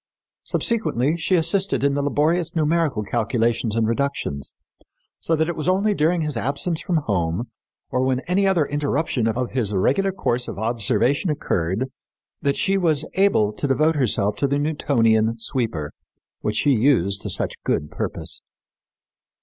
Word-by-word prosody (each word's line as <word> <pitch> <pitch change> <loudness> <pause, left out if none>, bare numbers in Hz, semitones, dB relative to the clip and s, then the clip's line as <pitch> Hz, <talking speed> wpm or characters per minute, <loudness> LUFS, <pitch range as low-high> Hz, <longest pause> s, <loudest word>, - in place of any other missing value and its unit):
Subsequently 165 - 0
she 175 +2 +1
assisted 185 +1 +1
in 140 0 +3
the 145 - 0
laborious 155 +5 +1
numerical 155 -7 +1
calculations 115 +1 0
and 115 -1 +1
reductions, 115 - -2 0.7
so 165 - 0
that 160 0 +1
it 170 - -2
was 160 +3 -1
only 200 +3 +2
during 165 0 +1
his 150 -3 -2
absence 145 +7 -2
from 175 -1 0
home 90 +2 -1 0.4
or 125 - +1
when 130 0 +1
any 195 +5 +1
other 175 -6 +3
interruption 145 -4 -1
of 120 +2 -1
his 120 -5 -1
regular 190 - +2
course 125 -10 -1
of - - -6
observation 120 - +1
occurred 110 - -1 0.5
that 140 0 0
she 195 0 +1
was 155 -4 +1
able 185 - +3
to 140 - -3
devote 155 +4 +3
herself 105 -6 +1
to 140 - +1
the 140 +1 0
Newtonian 115 -7 +1
sweeper, 115 - -2 0.5
which 105 - -2
she 145 +6 +2
used 110 -6 +2
to - - -4
such - - -1
good 75 - -1
purpose. - - -3
140 Hz, 155 wpm, -22 LUFS, 115-160 Hz, 0.7 s, in